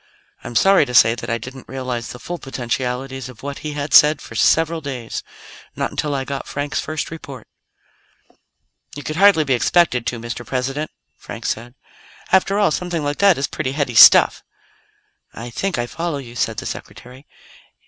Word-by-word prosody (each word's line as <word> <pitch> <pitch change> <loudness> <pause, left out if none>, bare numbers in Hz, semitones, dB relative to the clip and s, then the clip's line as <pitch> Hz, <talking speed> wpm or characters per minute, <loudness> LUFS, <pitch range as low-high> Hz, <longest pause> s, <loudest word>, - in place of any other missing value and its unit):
"I'm 120 - -8
sorry 195 +2 +5
to 125 - -5
say 115 0 +6
that 120 - -7
I 115 - 0
didn't 130 +2 -10
realize 130 -3 -4
the - - -8
full 175 +7 -6
potentialities 130 0 -4
of 125 -1 -14
what 140 0 -5
he 150 -1 -5
had 145 0 -4
said 150 +1 +7
for - - -11
several 165 0 +2
days 130 -5 -5 0.5
not - - -2
until 145 -2 -2
I 135 -1 -2
got 140 0 -5
Frank's 145 +1 -3
first 155 0 -4
report." 140 -7 -9 1.5
"You 145 - -7
could 155 +2 -5
hardly 195 -4 +5
be 135 - 0
expected 125 0 +2
to, 120 - -2
Mr. 120 +1 -6
President," 135 +5 -3 0.3
Frank - - -9
said. 120 +3 -4 0.6
"After 190 +1 +3
all, 205 -5 +3
something 175 -1 -2
like 145 0 -3
that 200 -3 +5
is 135 - 0
pretty 130 +1 -4
heady 140 -4 -2
stuff." 115 - +8 0.9
"I 120 +1 -7
think 195 +10 -2
I 120 - -1
follow 165 +4 -4
you," 120 -4 -10
said 115 - -1
the - - -5
Secretary. 130 +3 -9
135 Hz, 180 wpm, -20 LUFS, 125-155 Hz, 1.5 s, stuff